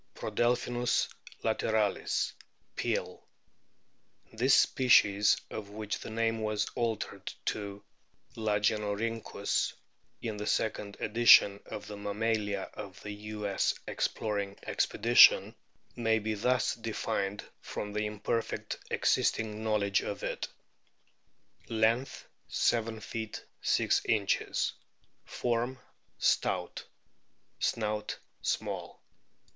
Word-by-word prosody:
Prodelphinus 120 0 +1 0.4
lateralis, 110 -2 +1 0.4
Peale. - - -2 0.5
* - - -36
This 130 +1 +6
species, 105 -5 +5
of 105 -2 -6
which 105 0 -4
the - - -7
name 115 0 0
was 105 -1 0
altered 115 -3 -2
to 100 -1 -3 0.5
Lagenorhynchus 105 +1 0 0.5
in 110 -3 -4
the 105 +1 -4
second 105 -2 -1
edition 105 -3 +6
of 105 - -6
the 105 - -7
Mammalia 105 -1 -1
of 100 -2 -8
the 105 - -5
U.S. 105 -1 -1
Exploring 100 -2 -2
Expedition, 120 +3 +5 0.4
may 115 -2 +2
be 110 0 -2
thus 125 +4 +1
defined 105 -3 -2 0.2
from 105 0 -5
the 105 0 0
imperfect 105 +2 -3
existing 110 -1 +1
knowledge 105 -2 +2
of 100 - -5
it: - - -2 1.2
Length, 115 +3 +1 0.2
7 115 -1 +1
ft. 110 0 -5 0.2
6 - - +2
in.; 105 -3 +1 1.0
form 120 +2 -1 0.4
stout; - - 0 0.7
snout 105 -2 -1 0.2
small. - - -3
110 Hz, 95 wpm, -31 LUFS, 105-115 Hz, 1.2 s, This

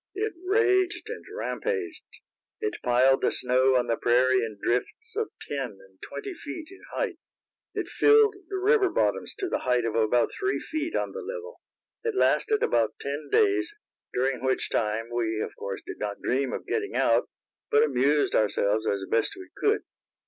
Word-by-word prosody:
It 430 +2 -1
raged 380 -2 +2
and - - -7
rampaged. 400 -9 -3 0.6
It 430 -1 -3
piled 130 +2 +4
the - - +2
snow 130 +1 +2
on 125 -1 +3
the 115 -1 0
prairie 125 +1 +3
in 110 -2 -5
drifts 260 - -2
of 440 0 -1 0.2
ten - - -3
and - - -21
twenty 400 -2 -6
feet 315 -1 -7
in 385 - -14
height. 395 -9 -2 0.6
It - - -2
filled 435 -1 +5
the 390 - -2
river 400 +1 +4
bottoms - - 0
to 390 - -2
the - - -1
height 125 -2 +1
of 115 - -1
about 115 +2 +2
three 395 0 -1
feet 315 +1 -3
on - - -1
the 475 - -6
level. 475 +2 -7 0.4
It 455 -3 -1
lasted 430 +2 +2
about 115 -2 +2
ten 145 +1 -4
days, 400 -2 +2 0.4
during 130 0 0
which 130 0 0
time, 115 +2 -1
we 115 -2 -1
of - - -4
course, 100 -1 -5
did - - -7
not 105 -1 -3
dream 130 +1 0
of - - -5
getting 415 -2 -2
out, - - +3 0.4
but 145 - +5
amused 145 +1 +2
ourselves 105 +1 +2
as 100 -1 0
best 115 - +1
we 370 - -11
could. 425 0 +2
150 Hz, 175 wpm, -27 LUFS, -, 0.6 s, filled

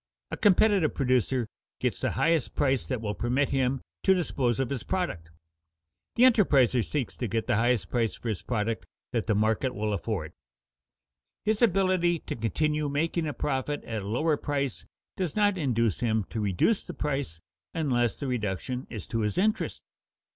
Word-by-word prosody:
A - - -3
competitive 200 -4 +4
producer 130 -2 +1 0.3
gets - - -1
the - - 0
highest 165 -5 +1
price 135 -3 +1
that 130 -4 -2
will 105 -2 -2
permit 125 +6 0
him 135 -1 +1 0.2
to 190 - +4
dispose 135 - 0
of 135 -1 -1
his 135 -4 -2
product. 95 - -3 0.9
The 240 - +4
enterpriser 140 - +5
seeks 140 -1 -2
to 120 - -2
get 110 +2 -1
the 120 -4 +1
highest 115 -5 +1
price 115 -3 0
for 120 - -5
his 105 - -2
product 115 -1 -2 0.3
that 115 -4 -1
the 110 - +2
market 110 +4 +1
will 105 0 -1
afford. 100 - -3 1.1
His 215 +1 +1
ability 185 -5 +3
to - - -6
continue 150 +6 0
making 160 +3 0
a 150 - -2
profit 140 +2 -2
at 110 -2 -4
a 100 - -7
lower 150 +8 +1
price 140 -4 -2 0.3
does 180 -5 -2
not 205 -2 +3
induce 115 - +1
him 110 -3 +1
to 115 - -3
reduce 105 - +2
the 175 - -8
price 135 - -2 0.4
unless 120 -8 +1
the - - -6
reduction 125 +1 -2
is 110 -5 -6
to 115 - -2
his 105 -1 -1
interest. 215 +4 0
130 Hz, 170 wpm, -28 LUFS, 115-160 Hz, 1.1 s, enterpriser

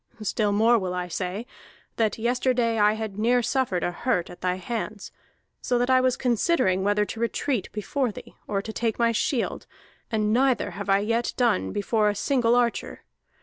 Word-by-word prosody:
Still 210 0 0
more 225 +3 +4
will 185 -2 -3
I 180 0 -3
say, 185 +5 -4 0.5
that 220 -3 +1
yesterday 240 -1 +1
I 210 0 +5
had 215 -2 -5
near 240 +2 +3
suffered 235 -9 0
a 175 - 0
hurt 180 -2 -1
at 175 - -13
thy 180 0 0
hands, 210 +1 -5 0.5
so 245 - 0
that 245 +2 +1
I 255 0 +5
was 255 -1 +1
considering 235 - +1
whether 205 +1 +2
to 225 - -7
retreat 235 -1 -1
before 230 +5 -2
thee, - - -11
or 200 -1 -1
to 220 - -6
take 230 -1 -1
my 235 -1 +3
shield, 230 +2 -1 0.4
and 215 -1 0
neither 255 -4 +2
have 200 +2 -6
I 195 +1 +4
yet 230 +3 -1
done 95 - +1
before 210 +1 +1
a 205 - -1
single 240 0 +2
archer. 240 -1 -1
220 Hz, 185 wpm, -25 LUFS, 200-240 Hz, 0.5 s, I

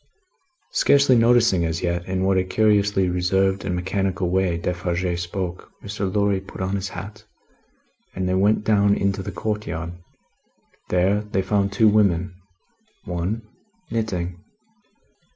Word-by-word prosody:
Scarcely 140 -2 +4
noticing 115 -6 +4
as 80 0 -2
yet, 85 0 -1
in 95 0 -1
what 95 0 +2
a - - +1
curiously 100 -1 +2
reserved 95 +2 +1
and 90 -2 -2
mechanical 95 0 -1
way 95 -2 +1
Defarge 90 0 -2
spoke, 90 0 -5
Mr. 100 -2 -3
Lorry 100 -1 +1
put 95 - -11
on 95 +1 -1
his 95 -1 -3
hat 100 +4 -8 0.9
and 95 0 -2
they 90 - 0
went 100 +3 +2
down 100 -2 +3
into 100 0 0
the - - -5
courtyard. 90 -6 -4 1.0
There, 95 +3 +2
they 105 -2 -2
found 100 0 +1
two 110 +2 +4
women; 95 -4 +2 0.7
one, 90 +6 -3 0.5
knitting. 90 -5 -3
95 Hz, 135 wpm, -23 LUFS, 90-105 Hz, 1.0 s, Scarcely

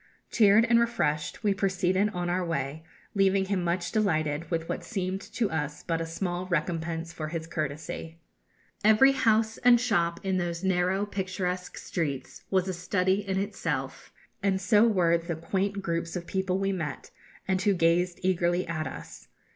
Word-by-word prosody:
Cheered 215 0 +5
and 235 0 +4
refreshed 230 -9 -1
we 205 -2 +3
proceeded 190 +1 +1
on 180 -3 -3
our 180 +1 0
way, 160 -2 -3 0.3
leaving 195 -1 +3
him 190 -2 -1
much 175 0 -1
delighted 155 -7 0
with 165 -2 -2
what - - -3
seemed 190 -3 -3
to 225 -4 0
us 150 -2 -3
but 165 -1 -1
a 165 - -3
small 175 +2 -3
recompense 165 -1 -2
for 155 -1 -4
his 160 0 -4
courtesy. 155 +1 -5 0.7
Every 220 +6 +6
house 225 -3 +2
and 245 -1 +6
shop 175 -9 +1
in 190 -1 0
those 175 0 -2
narrow 190 +1 +1
picturesque 185 -2 -3
streets 145 -7 -4
was 190 -1 +1
a 190 - -1
study 185 +2 +1
in 190 0 0
itself, 165 -9 -3 0.3
and 195 -1 +1
so 215 +2 +4
were 170 -6 +3
the 170 0 -4
quaint 195 +5 -2
groups 170 0 -2
of 175 -1 -4
people 190 +1 -1
we 195 0 0
met, 165 -6 -4 0.4
and 190 -1 +1
who 200 -1 +3
gazed 175 +1 +2
eagerly 175 -1 +1
at 155 -2 -2
us. 80 -1 -9
180 Hz, 165 wpm, -28 LUFS, 165-195 Hz, 0.7 s, Every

